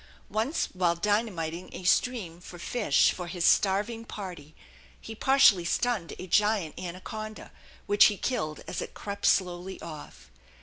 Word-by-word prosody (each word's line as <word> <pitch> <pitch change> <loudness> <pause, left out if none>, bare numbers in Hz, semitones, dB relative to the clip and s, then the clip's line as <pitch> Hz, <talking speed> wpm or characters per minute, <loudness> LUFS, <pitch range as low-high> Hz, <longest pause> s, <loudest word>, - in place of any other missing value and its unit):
Once 225 +9 0
while 180 -2 +1
dynamiting 185 -4 -1
a - - -7
stream 185 -3 +1
for 175 - -11
fish 205 - +2
for 180 -1 -6
his 175 0 -2
starving 210 +4 +2
party 180 -9 -8 0.4
he 225 - -8
partially 225 -6 +5
stunned 215 0 -1
a - - -7
giant 205 -3 +2
anaconda, 215 +5 -7 0.3
which 205 0 +6
he 205 - +3
killed 155 -10 -2
as - - -4
it - - -7
crept 200 0 -3
slowly 180 0 0
off. 155 -3 -10
190 Hz, 140 wpm, -28 LUFS, 175-215 Hz, 0.4 s, which